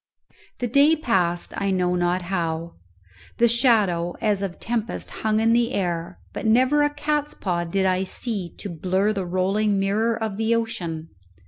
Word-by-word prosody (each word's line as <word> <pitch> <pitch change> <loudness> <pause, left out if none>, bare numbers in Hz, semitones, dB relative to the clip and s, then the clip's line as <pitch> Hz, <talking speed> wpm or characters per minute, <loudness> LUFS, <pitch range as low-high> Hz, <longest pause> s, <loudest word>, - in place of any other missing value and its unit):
The 245 - -2
day 280 +6 +5
passed 185 - 0
I 200 - 0
know 180 -2 +1
not 175 +1 0
how. 170 -2 -2 0.6
The 235 - +5
shadow 215 -8 +2
as 210 -3 +1
of 190 -3 -4
tempest 230 -1 -3
hung 215 0 +1
in 225 +1 +3
the 240 +1 +2
air, 175 -1 -2 0.2
but - - -3
never 260 +6 +4
a 290 - +3
cats 295 0 -2
paw 175 -3 -2
did 190 +3 0
I 185 0 +2
see 190 -1 -4
to - - -6
blurr 190 +5 0
the 195 -3 -3
rolling 195 +3 +1
mirror 215 +4 +1
of 220 -3 -3
the 225 +1 +2
ocean. 170 -8 -3
200 Hz, 165 wpm, -23 LUFS, 180-230 Hz, 0.6 s, day